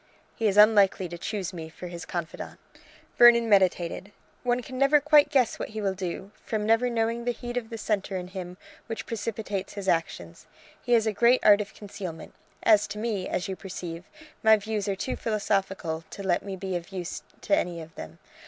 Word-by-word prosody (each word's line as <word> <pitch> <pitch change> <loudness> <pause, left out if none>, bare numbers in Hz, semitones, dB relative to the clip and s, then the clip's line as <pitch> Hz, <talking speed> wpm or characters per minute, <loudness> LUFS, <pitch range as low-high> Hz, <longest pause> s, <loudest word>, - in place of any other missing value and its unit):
"He 225 - 0
is 200 -1 +1
unlikely 205 -3 +5
to 175 - -7
choose 195 -4 -4
me 160 -2 -7
for 160 - -10
his 175 -1 -7
confidante." 170 -2 -5 0.6
Vernon 235 -1 +8
meditated. 190 -1 +2 0.3
"One 245 0 0
can 255 +1 -7
never 275 +2 +5
quite 295 0 +5
guess 265 -5 +2
what - - -4
he - - -1
will 195 -2 0
do, 190 +1 -5
from 215 -2 -2
never 225 +3 +3
knowing 230 0 -1
the 245 - 0
heat 240 +1 -7
of 235 -3 -3
the 230 - -6
centre 205 -3 -2
in 180 0 -6
him 180 -1 -7 0.3
which 225 -1 -5
precipitates 210 -3 -4
his 200 -2 -6
actions: 125 - -2 0.3
he 245 - 0
has 225 -2 +4
a 220 - 0
great 240 +5 +4
art 205 0 +7
of 205 - -8
concealment. 185 -6 -8 0.3
As 210 -1 +5
to - - -7
me, 210 -4 -2
as 180 - -2
you 190 - -3
perceive, 175 -2 -7 0.4
my 220 0 +6
views 210 -1 -3
are 200 - 0
too 200 +7 -3
philosophical 195 -6 -1
to 200 - -8
let 180 -2 +1
me 195 -1 -6
be 190 0 -4
of 175 -1 -5
use 180 -3 -5 0.2
to 200 - +2
any 175 -1 -2
of 160 0 -10
them. 80 +1 -9
200 Hz, 200 wpm, -27 LUFS, 180-225 Hz, 0.6 s, Vernon